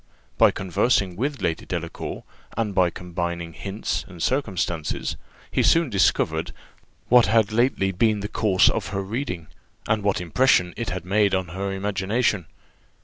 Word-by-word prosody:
By - - +7
conversing 95 0 +1
with 140 +7 -3
Lady 80 -1 -1
Delacour, 85 -2 -5 0.3
and 110 -3 -1
by 90 -2 +3
combining 85 -1 -4
hints 100 +5 -3
and 90 -4 -12
circumstances, 95 - -1 0.4
he - - +2
soon 165 -5 +3
discovered 80 -4 +1 0.5
what 125 -1 +6
had 110 0 +3
lately 115 -4 +2
been 105 +2 +1
the 105 - -3
course 100 -3 +3
of - - 0
her 100 0 -3
reading, 95 - -4 0.4
and 105 -1 +1
what 100 -1 +1
impression 90 0 +2
it 120 -5 -3
had 90 -1 -4
made 100 +1 +2
on 95 -2 -2
her 95 +3 -3
imagination. 100 0 0
95 Hz, 145 wpm, -24 LUFS, 90-110 Hz, 0.5 s, By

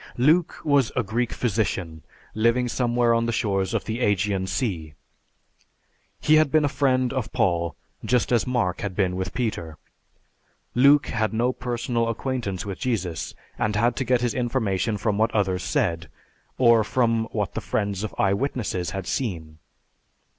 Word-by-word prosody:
Luke 155 +7 +3
was 140 -5 +3
a 130 - +1
Greek 115 +4 -1
physician 95 -8 -2 0.3
living 115 +3 +2
somewhere 120 -1 +1
on 115 0 +1
the - - 0
shores 100 -5 0
of - - -1
the 110 +1 -3
Ægean 100 -3 +1
Sea. 85 - -3 1.2
He 155 +1 +4
had 155 -2 +4
been 155 -1 +4
a - - +3
friend 130 -3 +1
of 130 -4 -3
Paul, 85 -3 0 0.3
just 125 0 +1
as 120 -1 +2
Mark 120 -8 0
had 100 -4 -4
been 95 -3 +1
with 95 0 -3
Peter. 90 -11 -3 1.0
Luke 140 +4 +5
had 110 -1 -1
no 120 +3 +1
personal 120 -2 -2
acquaintance 115 -6 -3
with 100 -2 -5
Jesus 95 -10 -2 0.2
and 105 -1 0
had 120 +3 +2
to - - 0
get 125 -1 +2
his 120 -2 0
information 115 -4 0
from 105 0 -1
what 110 - +3
others 95 -3 +1
said, 80 -4 -1 0.5
or 115 -3 +5
from 115 0 +1
what 105 -5 -3
the - - -3
friends 100 -2 -2
of 110 - -5
"eye 100 -1 +3
witnesses" 100 -7 -2
had 95 +1 -5
seen. 85 -8 -3
115 Hz, 160 wpm, -24 LUFS, 95-125 Hz, 1.2 s, Luke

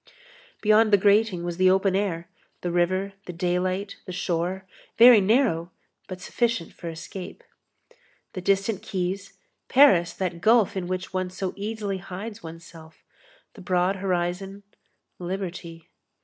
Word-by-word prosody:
Beyond 215 +1 +4
the 205 - +7
grating 200 -2 +3
was 175 -1 -4
the 185 0 +5
open 190 0 +2
air, 175 -4 -1 0.3
the 175 - -2
river, 185 +3 0
the 180 - -5
daylight, 185 +3 -1
the - - -5
shore, 180 +1 -2 0.3
very 235 -2 +9
narrow 195 -6 +2 0.4
but 185 -1 -7
sufficient 230 -1 -1
for 170 - -7
escape. 180 - -8 0.9
The 185 - -5
distant 195 +2 +1
quays, 195 0 -4 0.4
Paris, 220 -12 +5
that 180 -3 -4
gulf 220 0 +4
in 185 -2 -3
which 185 +1 -4
one 185 -1 -1
so 185 0 -4
easily 205 -1 -4
hides 205 +4 -8
oneself, 165 -1 -12 0.5
the 205 - -13
broad 180 +1 +1
horizon, 190 +1 -2 0.6
liberty. 175 -2 -6
185 Hz, 135 wpm, -25 LUFS, 175-200 Hz, 0.9 s, very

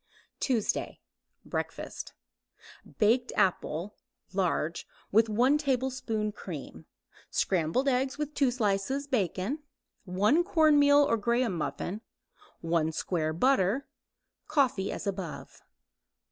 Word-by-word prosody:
TUESDAY 235 -6 -1 0.5
BREAKFAST - - -5 0.8
Baked 235 +3 +3
apple 185 -1 0 0.4
(large) 175 -3 -1 0.2
with 225 +2 +4
1 250 +7 +3
tablespoon 255 -6 -1
cream; 150 - -8 0.4
scrambled 185 - +1
eggs 265 +1 +1
with 300 0 -3
2 280 -3 +3
slices 240 +3 0
bacon; 215 - -1 0.5
1 210 - +3
cornmeal 295 -5 +5
or 255 -5 +2
graham 235 -1 +1
muffin; 175 +6 -3 0.6
1 165 -1 +1
square 155 -2 -1
butter; 250 - +2 0.6
coffee 260 -10 +1
as - - -5
above. 190 -5 -5
220 Hz, 95 wpm, -29 LUFS, 185-270 Hz, 0.8 s, cornmeal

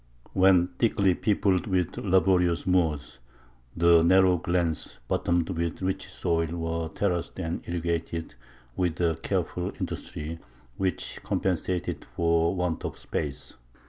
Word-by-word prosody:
When 95 -2 +5
thickly 100 -5 +3
peopled 95 -1 +1
with 90 -3 0
laborious 90 -2 +2
Moors, 80 -8 0 0.6
the 85 0 +6
narrow 95 +1 +5
glens, 85 -7 -1
bottomed 85 +1 +1
with 85 -2 -2
rich 95 0 -2
soil, 85 -1 0
were 80 -1 -2
terraced 90 -1 -2
and 85 -2 -3
irrigated 85 -1 -2 0.4
with 90 -3 -1
a 85 -2 +2
careful - - -1
industry 80 +2 -5 0.4
which 95 -3 -2
compensated 90 -1 -1
for 85 +1 +2
want 90 -3 -1
of - - -4
space. 75 -4 -5
85 Hz, 115 wpm, -27 LUFS, 80-95 Hz, 0.6 s, the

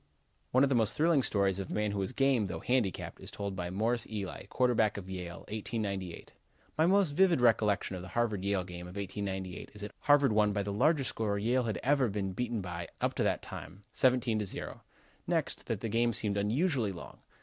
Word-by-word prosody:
One 130 +2 +4
of 140 - +4
the - - +2
most 115 -2 +2
thrilling 160 -2 +4
stories 100 -5 +2
of 95 - -5
a - - -4
man 105 -1 0
who 100 - -2
was 95 +4 -1
game, 130 -5 +2
though 90 - -5
handicapped, 125 -7 -1
is - - -7
told 100 -1 -4
by 90 -2 -3
Morris 110 +5 0
Ely, 100 -3 -5
quarterback 120 -4 +2
for 100 - -4
Yale, 90 -2 -6
1898. 100 -4 -4 0.4
"My 160 +2 +3
most 195 -4 +4
vivid 175 0 +4
recollection 105 -5 +2
of 90 - -6
the 95 - -8
Harvard 110 -1 -1
Yale 100 -2 +1
game 90 -1 -8
of 90 - -11
1898 95 -1 -4
is 105 - -8
that 105 0 -6
Harvard 145 -5 +4
won 105 -1 +3
by 100 -1 0
the 100 0 -3
largest 140 +5 +3
score 105 -2 -1
Yale 120 +4 +1
had 105 -6 -2
ever 135 -1 +3
been 100 -2 -2
beaten 120 +1 -2
by 85 -2 -5
up - - 0
to - - -2
that - - +1
time, 100 +2 -9
17 125 -3 +3
to 105 - -1
0. - - -5 0.5
Next, - - -1
that - - -2
the 115 - -2
game 115 +2 +2
seemed 105 -2 +1
unusually 115 - +1
long. 85 - -10
105 Hz, 215 wpm, -31 LUFS, 95-125 Hz, 0.5 s, One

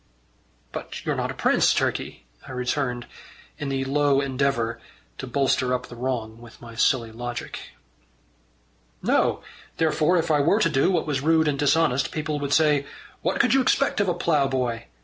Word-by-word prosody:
"But - - -7
you're - - 0
not - - -2
a - - -5
prince, - - +3
Turkey," - - -2 0.2
I 130 - -7
returned, 125 -1 -2 0.5
in 145 -2 -3
the 135 0 -1
low 140 0 +2
endeavour 130 -4 -1 0.4
to - - -5
bolster 130 -1 +1
up 125 - -5
the 120 - -9
wrong 115 -3 -3
with 120 -1 -14
my 115 -1 -11
silly 115 0 +1
logic. 120 +1 -6 1.4
"No. - - +1 0.3
Therefore 160 +2 +2
if 165 - 0
I 150 - +4
were 165 +9 +3
to 165 - +3
do 135 +4 +3
what 185 - +1
was 145 -4 -1
rude 160 +1 +3
and 140 -2 0
dishonest, 140 -3 +2
people 155 -1 -3
would 140 -1 -3
say: 150 -2 +3 0.3
'What - - -1
could - - +4
you 270 - +5
expect 275 0 +1
of 200 - +1
a 175 - 0
ploughboy? 135 -8 0
140 Hz, 170 wpm, -24 LUFS, 125-155 Hz, 1.4 s, you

